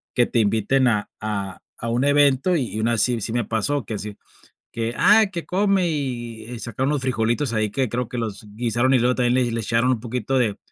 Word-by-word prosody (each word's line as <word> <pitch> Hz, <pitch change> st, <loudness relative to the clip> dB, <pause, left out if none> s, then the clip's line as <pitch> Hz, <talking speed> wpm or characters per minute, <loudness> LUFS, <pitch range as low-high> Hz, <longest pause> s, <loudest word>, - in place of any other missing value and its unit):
que 120 Hz, -, +4 dB
te 120 Hz, -, 0 dB
inviten 110 Hz, +5 st, +2 dB
a 105 Hz, -2 st, -1 dB
a 100 Hz, -3 st, -4 dB, 0.2 s
a 115 Hz, -, -3 dB
un 120 Hz, +3 st, 0 dB
evento, 145 Hz, +4 st, +3 dB
y 120 Hz, -6 st, -3 dB
una 115 Hz, +1 st, +1 dB
sí, 120 Hz, 0 st, +1 dB
sí 110 Hz, -, -2 dB
me 120 Hz, -2 st, 0 dB
pasó, 115 Hz, +6 st, -1 dB
que 110 Hz, -, -5 dB
así, 105 Hz, 0 st, -7 dB, 0.5 s
que, 115 Hz, 0 st, -3 dB
ah, 215 Hz, +2 st, +6 dB
que 170 Hz, -3 st, -5 dB
come 195 Hz, -1 st, +1 dB
y 120 Hz, -5 st, -4 dB
sacaron 120 Hz, +4 st, -2 dB
los 145 Hz, -, -1 dB
frijolitos 125 Hz, +1 st, 0 dB
ahí 110 Hz, -1 st, 0 dB
que 130 Hz, +1 st, -1 dB
creo 125 Hz, +1 st, -2 dB
que 125 Hz, -, -5 dB
los 110 Hz, -1 st, -5 dB
guisaron, 120 Hz, +3 st, +1 dB
y 130 Hz, -, +4 dB
luego 125 Hz, +1 st, +2 dB
también 120 Hz, -1 st, +1 dB
le 125 Hz, -2 st, +1 dB
le 115 Hz, -, -2 dB
echaron 115 Hz, +3 st, +1 dB
un 120 Hz, -, 0 dB
poquito 125 Hz, +2 st, -2 dB
de 110 Hz, -5 st, +1 dB
120 Hz, 220 wpm, -22 LUFS, 110-130 Hz, 0.5 s, ah